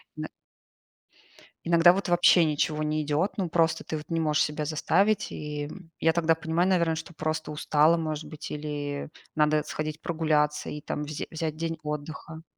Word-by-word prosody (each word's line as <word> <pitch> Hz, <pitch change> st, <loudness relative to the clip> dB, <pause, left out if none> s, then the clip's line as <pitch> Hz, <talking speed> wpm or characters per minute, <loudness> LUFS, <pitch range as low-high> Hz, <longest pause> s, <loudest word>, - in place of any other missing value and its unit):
На -, -, -4 dB, 1.4 s
Иногда 170 Hz, +1 st, +6 dB
вот 195 Hz, 0 st, -2 dB
вообще 175 Hz, 0 st, +6 dB
ничего 155 Hz, 0 st, 0 dB
не 155 Hz, 0 st, 0 dB
идет. 150 Hz, +6 st, 0 dB
Ну, 185 Hz, -4 st, -2 dB
просто 165 Hz, -1 st, +2 dB
ты 155 Hz, -, -3 dB
вот 150 Hz, -, -10 dB
не 165 Hz, -1 st, -1 dB
можешь 150 Hz, -1 st, +2 dB
себя 150 Hz, 0 st, -3 dB
заставить. 185 Hz, +7 st, +1 dB
И, 150 Hz, -1 st, -5 dB
м, 180 Hz, -4 st, -12 dB
я 160 Hz, 0 st, +4 dB
тогда 165 Hz, -1 st, +3 dB
понимаю, 170 Hz, +2 st, 0 dB
наверное, 170 Hz, -3 st, +2 dB
что 165 Hz, +1 st, -7 dB
просто 155 Hz, 0 st, -3 dB
устала, 150 Hz, +2 st, +3 dB
может 155 Hz, -1 st, -3 dB
быть, 155 Hz, 0 st, -8 dB
или 145 Hz, -1 st, -4 dB, 0.2 s
надо 150 Hz, -1 st, +3 dB
сходить 155 Hz, 0 st, -4 dB
прогуляться 155 Hz, -3 st, 0 dB
и 150 Hz, -, -6 dB
там 150 Hz, -, -4 dB
взя 150 Hz, 0 st, -5 dB
взять 160 Hz, -1 st, -3 dB
день 165 Hz, 0 st, -3 dB
отдыха. 155 Hz, +1 st, -6 dB
155 Hz, 170 wpm, -27 LUFS, 150-165 Hz, 1.4 s, Иногда